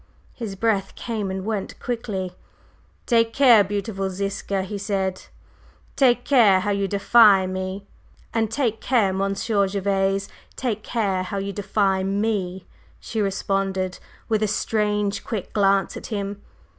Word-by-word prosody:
His 220 -5 -6
breath 195 -2 0
came 220 -4 -3
and 190 0 -4
went 215 -3 -3
quickly. 205 -7 -3 0.7
"Take 230 -2 +2
care, 245 -7 +6
beautiful 200 0 -3
Ziska!" 195 0 -2
he 200 +2 -5
said. 195 -2 -2 0.7
"Take 245 -3 +3
care 215 -9 +5
how 205 - -1
you 200 -1 0
defy 200 0 +5
me!" 185 +1 -4 0.5
"And 225 -1 +1
take 225 -3 -1
care, 225 -7 +2
Monsieur 195 +1 0
Gervase; 195 0 0 0.3
take 225 -5 -2
care 205 -5 -1
how 185 +2 -4
you 195 0 -3
defy 200 -1 +1
me!" 195 -2 -1 0.3
she 220 - -3
responded, 195 -1 -1 0.3
with 220 -2 +1
a 215 - +2
strange, 210 -1 0
quick 210 -5 -5
glance 195 -1 +2
at - - -7
him. 200 -2 -4
200 Hz, 135 wpm, -23 LUFS, 195-220 Hz, 0.7 s, care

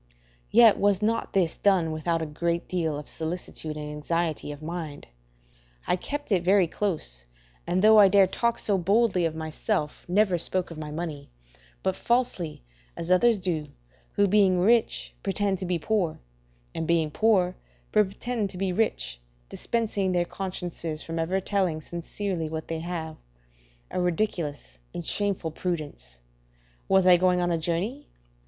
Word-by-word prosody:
Yet 230 -1 +6
was 200 0 +2
not 230 +2 0
this 180 -5 +2
done 185 -5 +3
without 165 +1 -1
a - - -2
great 170 +3 -2
deal 165 -5 -1
of 150 - -8
solicitude 160 -2 -5
and 150 0 -5
anxiety 155 +1 -2
of 145 +1 -9
mind; 160 -3 -5 0.8
I - - +2
kept 290 +8 -5
it 185 -3 +3
very 190 +1 +5
close, 155 - -3 0.4
and 185 +2 +1
though 215 0 +8
I 200 - +9
dare 195 0 +6
talk 235 +5 0
so 200 -2 +1
boldly 195 -1 +2
of 160 -1 -1
myself, 160 +1 -2
never 185 -1 +2
spoke 185 +1 -1
of 160 - -8
my 155 -1 -5
money, 150 -2 -5 0.5
but 190 -1 +1
falsely, 235 - -1 0.3
as 170 +2 -3
others 225 +5 +5
do, 170 -5 -2 0.5
who 200 - +3
being 190 -2 +4
rich, 225 +5 +2
pretend 195 -1 0
to 185 - -4
be 180 -1 +1
poor, 180 -2 -1 0.5
and 160 - -3
being 165 -2 +2
poor, 185 -2 +2 0.4
pretend 210 +1 0
to 185 - -9
be 190 -1 -1
rich, 175 - -1 0.3
dispensing 210 -5 -1
their 175 -1 +2
consciences 175 -4 -4
from 165 0 -4
ever 180 +4 0
telling 190 -5 0
sincerely 170 +1 -4
what 160 0 -5
they 165 -1 -2
have: 160 -2 -5 0.7
a - - -1
ridiculous 170 - -2 0.2
and 175 - -4
shameful 200 -5 -1
prudence. 150 - -5 0.7
Was 190 -1 +4
I 180 -1 +8
going 180 0 +3
a 175 -1 +1
journey? 175 - -2
180 Hz, 155 wpm, -26 LUFS, 160-200 Hz, 0.8 s, I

